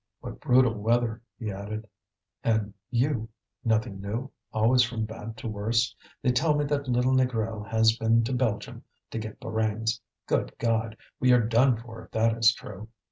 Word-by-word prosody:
"What - - -7
brutal 125 -1 +4
weather!" 115 +1 +1 0.2
he 110 -4 -4
added. 105 +3 -6 0.6
"And 110 -3 +1 0.2
you 120 -2 0 0.3
nothing 110 -3 0
new, 115 +7 -4 0.2
always 115 +4 +4
from 115 -2 0
bad 110 0 -8
to - - -6
worse? 115 +3 0 0.3
They 125 - +4
tell 150 +5 +2
me 145 0 +1
that 140 -1 -1
little 125 +1 +2
Négrel 115 -4 0
has 110 0 +4
been 115 0 +3
to 115 - -2
Belgium 120 -5 -1 0.3
to 115 - -3
get 110 -1 -7
Borains. 110 0 -1 0.3
Good - - -1
God! 115 -1 0 0.2
we 125 - +4
are 120 -2 +5
done 120 +2 +4
for 115 0 -10
if - - -17
that 115 0 +3
is 115 0 +6
true!" 105 -2 -9
115 Hz, 170 wpm, -27 LUFS, 110-125 Hz, 0.6 s, is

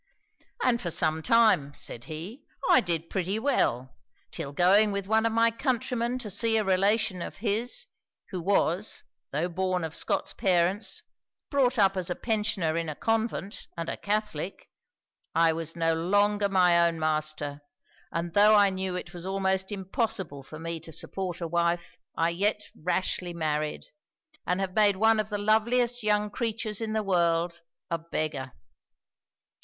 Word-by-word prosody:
'"And 240 -2 +2
for 175 - -2
some 160 -1 +1
time," 185 -7 +4
said 120 0 -4
he, 175 - -7 0.2
"I 260 - +6
did 170 -4 -2
pretty 190 +2 -1
well; 130 - 0 0.4
till 150 -5 -5
going 195 +7 +4
with 200 -1 -2
one 220 +2 +3
of - - -1
my 230 +1 +3
countrymen 240 0 -1
to 240 -4 -6
see 225 +3 +2
a 215 - +2
relation 195 0 +2
of - - -6
his, 230 - -1 0.5
who 185 -3 -3
was 195 +1 0 0.3
(tho' 155 +5 0
born 185 0 -1
of 160 -1 -4
Scots - - 0
parents) 185 +2 +1 0.5
brought 265 -3 +2
up 195 -2 +4
as 185 -2 -1
a 175 - -1
pensioner 210 -8 0
in 165 -1 -2
a 150 - -4
convent, 225 -2 -2
and 165 0 -3
a - - -2
Catholic, 205 -4 -3 0.6
I 165 0 +4
was 165 0 -4
no 165 -1 +2
longer 205 +4 +2
my 175 -3 +5
own 165 -1 -2
master, 155 -2 -2 0.5
and 170 0 -3
tho' 210 +1 +6
I 200 -1 +5
knew 190 -1 -3
that 180 -1 -5
it - - -17
was 175 +1 -7
almost 190 0 0
impossible 190 - -2
for 155 +3 -11
me 165 +1 -4
to 160 +1 -12
support 180 +3 -4
a 170 - -2
wife, 170 +1 -1 0.2
I 165 +1 +2
yet 205 +4 0
rashly 180 +1 -2
married, 155 -2 -2 0.6
and 180 +1 +1
have 190 -1 -2
made 205 -1 +4
one 220 +2 +4
of 215 0 -1
the 210 - -2
loveliest 235 +4 +2
young 210 -1 +1
creatures 220 -1 -3
in 220 -1 -2
the 220 -1 0
world 170 -2 +1 0.3
a 170 - 0
beggar. 150 -5 -3
190 Hz, 165 wpm, -28 LUFS, 165-215 Hz, 0.6 s, I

